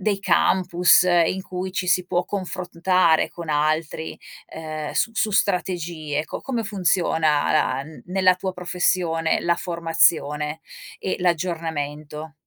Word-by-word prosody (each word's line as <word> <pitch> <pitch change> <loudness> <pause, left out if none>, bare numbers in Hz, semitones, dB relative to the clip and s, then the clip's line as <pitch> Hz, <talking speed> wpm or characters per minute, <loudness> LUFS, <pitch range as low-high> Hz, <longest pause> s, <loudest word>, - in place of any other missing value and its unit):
dei 200 0 0
campus 180 -3 +4
in 175 +1 +2
cui 185 0 -5
ci 185 - -2
si 180 +1 +2
può 175 0 0
confrontare 180 -3 +1
con 170 -2 -9
altri, 155 +1 -1 0.3
ehm, 155 -1 -6
s - - +1
su 220 - +1
strategie, 170 -6 -1
co - - -7
come 240 -4 -3
funziona 170 -6 +1
la 135 -3 +1
n 155 +1 -13
nella 185 0 +3
tua 185 +1 -4
professione 175 -2 0
la 170 0 +2
formazione 160 -3 +1 0.4
e 190 - -2
l'aggiornamento? 160 -3 -3
170 Hz, 125 wpm, -23 LUFS, 155-185 Hz, 0.4 s, campus